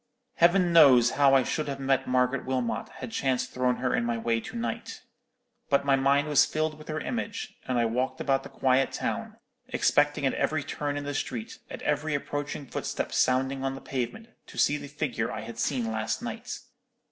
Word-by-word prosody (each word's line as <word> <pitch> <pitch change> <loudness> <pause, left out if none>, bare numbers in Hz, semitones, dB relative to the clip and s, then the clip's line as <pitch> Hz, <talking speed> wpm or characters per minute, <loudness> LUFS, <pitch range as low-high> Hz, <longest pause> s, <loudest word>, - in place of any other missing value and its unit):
Heaven 175 +1 +4
knows 130 -7 +7
how 140 -1 +5
I 135 - +5
should 155 +4 -2
have 140 -1 -4
met 135 -1 +1
Margaret 125 +1 +1
Wilmot 130 -2 -2
had 125 - -8
chance 130 -1 0
thrown 125 -1 0
her 125 0 -1
in - - +1
my 120 0 -1
way 115 0 0
to - - -9
night. 115 0 -4 0.7
But 140 0 +2
my 140 -1 +4
mind 140 +2 +2
was 145 -1 +5
filled 155 +1 -1
with 155 - -13
her 155 0 -2
image; 230 +1 -4
and 130 -1 0
I 120 - +3
walked 130 +3 -1
about 135 -1 +1
the - - -10
quiet 130 0 +2
town, - - -3 0.3
expecting - - +2
at - - +2
every - - 0
turn 145 -1 -3
in 145 - -3
the 145 0 -4
street, 115 -4 -4
at - - -8
every 150 +1 0
approaching 145 0 -4
footstep - - -4
sounding 130 +1 +1
on 135 0 -1
the - - -7
pavement, 135 - -4 0.2
to - - -12
see 145 - +3
the 145 -1 -8
figure 135 -5 -2
I - - -4
had 115 0 -8
seen 120 -3 0
last 110 0 -2
night. - - -5
135 Hz, 200 wpm, -28 LUFS, 125-145 Hz, 0.7 s, knows